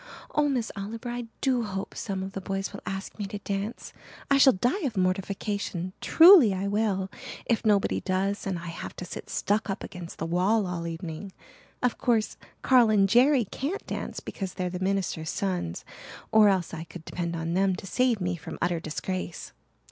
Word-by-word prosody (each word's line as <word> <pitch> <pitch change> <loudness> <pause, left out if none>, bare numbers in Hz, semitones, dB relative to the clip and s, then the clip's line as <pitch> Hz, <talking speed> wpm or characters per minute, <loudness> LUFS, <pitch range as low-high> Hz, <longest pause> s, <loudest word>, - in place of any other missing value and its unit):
Oh, 295 -1 +3
Miss 245 -5 -1
Oliver, 220 +4 -5
I 240 -1 -4
do 255 -2 +2
hope 195 -3 -4
some 195 -3 -3
of 190 - -5
the 195 - -5
boys 195 +1 -3
will 200 - -7
ask 195 +2 -5
me 205 - -2
to 205 +1 -5
dance. 200 +2 -4 0.4
I 280 - +6
shall 265 -1 +8
die 245 - 0
of 265 - -2
mortification 185 0 -1
truly 325 - +8
I 190 +2 -2
will, 200 -2 0 0.3
if 230 -2 +1
nobody 210 -3 +2
does 195 +2 -1
and 190 -2 -1
I 170 - -8
have 165 - -7
to 180 - -6
sit - - -8
stuck 210 +1 0
up 195 - -3
against 175 -2 -8
the - - -3
wall 190 +6 +2
all 180 -2 -3
the 170 0 -3
evening. 165 +3 -7 0.5
Of 250 - +1
course 225 -3 +1 0.3
Carl 250 -4 +6
and 200 -2 +4
Jerry 245 +4 +5
can't 290 - -4
dance - - -5
because 190 -2 -5
they're 180 -1 -2
the 180 - -4
minister's 185 -4 -1
sons, 180 - -2 0.5
or 215 -1 +7
else 185 -4 0
I 165 0 -5
could 165 -1 -11
depend 170 -1 -3
on 165 0 -2
them 190 0 +2
to 190 - -8
save 245 +2 +2
me 180 -1 -1
from 160 - -8
utter 175 -1 0
disgrace." 170 +2 -5
195 Hz, 195 wpm, -27 LUFS, 180-220 Hz, 0.5 s, shall